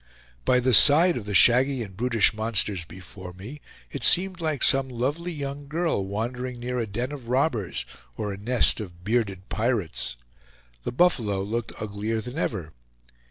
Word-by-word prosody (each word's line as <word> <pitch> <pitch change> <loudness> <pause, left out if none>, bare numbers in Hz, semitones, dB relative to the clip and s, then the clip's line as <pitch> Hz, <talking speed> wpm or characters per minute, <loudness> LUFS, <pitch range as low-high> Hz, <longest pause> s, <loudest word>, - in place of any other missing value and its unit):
By 125 - +3
the 125 0 +1
side 160 - +8
of 110 - -5
the 105 -1 -4
shaggy 125 +3 +4
and 100 -3 -11
brutish 115 0 +2
monsters 105 -4 -1
before 90 +1 -11
me, 115 +11 -10 0.3
it 140 - -6
seemed 185 +3 +4
like 155 -4 -1
some 135 -1 +3
lovely 140 +8 -3
young 140 -2 -6
girl 160 - -1
wandering 120 +5 -4
near 125 +1 -3
a 115 - -2
den 120 +6 -4
of 130 -5 -9
robbers 120 - -1 0.3
or 105 -1 -3
a - - -8
nest 120 +4 +2
of 90 -5 -9
bearded 100 -3 -2
pirates. 90 - -1 0.7
The - - -2
buffalo 120 - +1
looked 115 +3 -5
uglier 105 +2 -3
than 125 +7 -6
ever. 80 - -3
120 Hz, 160 wpm, -25 LUFS, 100-135 Hz, 0.7 s, side